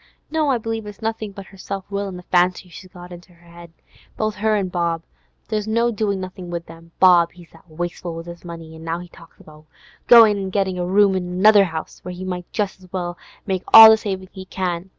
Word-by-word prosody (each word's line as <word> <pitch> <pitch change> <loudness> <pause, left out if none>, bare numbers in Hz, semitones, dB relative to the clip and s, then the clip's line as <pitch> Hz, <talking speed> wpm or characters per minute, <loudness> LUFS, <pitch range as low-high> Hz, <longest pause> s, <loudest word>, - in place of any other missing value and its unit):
No, 310 -2 0
I 260 - +2
believe 225 -1 -5
it's 210 +2 -11
nothin' 220 -1 -3
but 195 0 -10
her 195 - -17
self 195 0 -6
will 200 0 -2
an' 185 -2 -7
the 180 - -11
fancies 180 0 0
she's 185 +2 -12
got 180 0 -12
into 175 +1 -13
her 170 0 -16
'ead. 170 - -15 0.5
Both 215 0 -1
her 215 +1 +1
an' 195 -3 -1
Bob, 170 -2 -2 0.4
there's 215 -1 -3
no 230 +2 +1
doin' 205 -3 -2
nothin' 185 -1 -8
with 170 -1 -5
them. 165 +1 -14
Bob, 175 -2 +5
he's 175 -2 -17
that 175 - -21
wasteful 175 +1 -5
with 165 0 -8
his 170 0 -11
money; 165 -2 -10
an' 160 0 -12
now 165 +1 -3
he 175 0 -10
talks 165 0 -18
about 155 0 -17 0.4
goin' 225 -4 +7
an' 190 -1 -4
gettin' 190 -2 -1
a 175 - -2
room 200 +1 +4
in 180 -1 -3
another 200 +3 +5
'ouse, 160 -3 -7
when 180 0 -7
he 185 +1 -7
might 180 -1 -6
just 205 -3 -3
as 185 -1 -18
well 175 -2 -4 0.3
make 190 -3 -2
all 220 0 +12
the - - +6
savin' 190 -3 -5
he 190 -1 -10
can. 185 -1 -4
185 Hz, 235 wpm, -21 LUFS, 175-205 Hz, 0.5 s, all